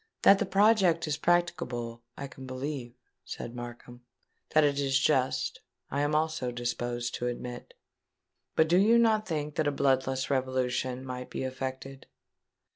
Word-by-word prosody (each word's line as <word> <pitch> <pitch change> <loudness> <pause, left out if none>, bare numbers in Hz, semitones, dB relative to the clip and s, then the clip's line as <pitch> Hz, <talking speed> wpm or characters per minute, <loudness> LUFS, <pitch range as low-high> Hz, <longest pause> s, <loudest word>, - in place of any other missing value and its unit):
"That 195 - +7
the - - 0
project 195 -5 +4
is 150 -2 -1
practicable, 160 -10 0 0.2
I 140 - -5
can 135 -1 -10
believe," 130 -2 -5 0.3
said 120 - -7
Markham; 120 0 -9 0.5
"that 155 -1 +4
it 145 -1 +2
is 135 -1 +2
just, 130 -2 +1 0.3
I 140 - 0
am 145 +1 +1
also 155 -5 0
disposed 120 0 -3
to 125 - -2
admit. 120 0 -6 0.8
But 160 - +4
do 175 +2 +4
you 220 +5 +5
not 220 -2 +3
think 150 -3 -3
that 155 -2 +2
a - - +2
bloodless 130 -1 +1
revolution 130 -1 -1
might 125 -1 -6
be - - -4
effected?" 130 +1 -5
135 Hz, 150 wpm, -29 LUFS, 125-155 Hz, 0.8 s, That